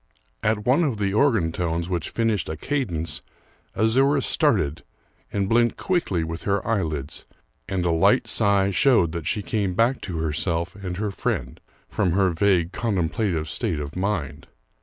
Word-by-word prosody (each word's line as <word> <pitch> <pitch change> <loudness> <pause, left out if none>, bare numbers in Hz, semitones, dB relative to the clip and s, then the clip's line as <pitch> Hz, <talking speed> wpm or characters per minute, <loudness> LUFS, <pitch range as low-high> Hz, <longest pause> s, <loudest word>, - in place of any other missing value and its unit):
At 105 -1 0
one 135 +7 +4
of 135 -8 0
the 100 -1 -1
organ 110 - +2
tones 85 0 -2
which 85 -4 -2
finished 110 -6 0
a 80 - -4
cadence, 85 - -3 0.5
Azouras 135 +6 +3
started, 75 +3 +1 0.5
and 100 -2 -1
blinked 120 +2 +2
quickly 170 - 0
with 80 +1 -5
her 100 0 0
eyelids, 80 - -2 0.4
and 90 -2 -1
a 85 - +2
light 80 0 +3
sigh 100 -1 +3
showed 100 - +3
that 85 -2 -5
she 105 -3 -1
came 100 -4 -1
back 120 +5 +2
to 90 -4 -5
herself 80 +3 -1
and 95 -3 -6
her 105 0 -2
friend, 60 -9 -3 0.3
from 90 - 0
her 95 -1 +3
vague 85 -1 +2
contemplative 95 -5 -1
state 75 0 -2
of 70 0 -6
mind. 85 -7 -3
95 Hz, 160 wpm, -24 LUFS, 80-110 Hz, 0.5 s, one